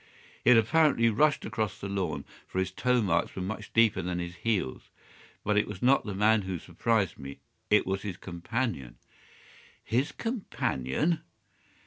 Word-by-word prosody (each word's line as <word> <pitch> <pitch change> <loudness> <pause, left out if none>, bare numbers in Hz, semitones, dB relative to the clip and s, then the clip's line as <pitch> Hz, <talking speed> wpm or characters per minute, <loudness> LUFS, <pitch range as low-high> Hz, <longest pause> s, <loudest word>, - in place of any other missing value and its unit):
He - - +4
had 125 - +8
apparently 115 0 +4
rushed 150 +7 +2
across 110 -2 -2
the 100 - -5
lawn, 100 -2 -2 0.2
for - - -7
his 95 0 0
toe 125 +4 +1
marks 90 -5 0
were 95 - -4
much 105 +2 -5
deeper 115 -2 +4
than 90 0 -3
his 85 0 -4
heels. 100 - -2 0.5
But 105 0 +1
it - - 0
was - - -7
not 130 -2 +4
the 100 - -3
man 105 +2 +4
who 95 -2 -4
surprised 110 +3 -1
me. 70 0 -8 0.3
It - - +4
was 95 +1 -1
his 100 -4 -5
companion." 85 - -3 0.9
"His 130 +5 0
companion!" 165 - -1
105 Hz, 160 wpm, -29 LUFS, 95-120 Hz, 0.9 s, had